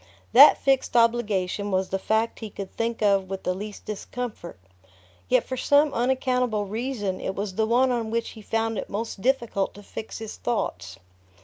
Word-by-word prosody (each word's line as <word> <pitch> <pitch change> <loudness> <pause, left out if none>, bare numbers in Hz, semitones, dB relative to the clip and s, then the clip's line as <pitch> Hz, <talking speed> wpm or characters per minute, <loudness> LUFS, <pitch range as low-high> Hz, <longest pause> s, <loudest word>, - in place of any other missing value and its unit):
That - - +9
fixed 270 -3 +1
obligation 210 -4 +1
was 190 -1 0
the 195 - -1
fact 220 +3 0
he 220 - -6
could 195 -1 -7
think 230 -1 -2
of 195 -2 +3
with 195 0 -5
the 180 - 0
least 205 +2 -8
discomfort, 215 - -6 0.7
yet - - +4
for 260 - -5
some 290 +3 +3
unaccountable 250 -3 0
reason 215 -2 -3
it 190 - -3
was 200 -1 -3
the 220 +3 0
one 250 +3 +3
on 230 -2 -1
which 230 +1 -1
he 220 - -11
found 225 0 -1
it - - -6
most 215 -1 -4
difficult 235 -6 0
to 205 - -12
fix 215 - -7
his 220 -1 -7
thoughts. 90 - -3
220 Hz, 180 wpm, -25 LUFS, 200-240 Hz, 0.7 s, That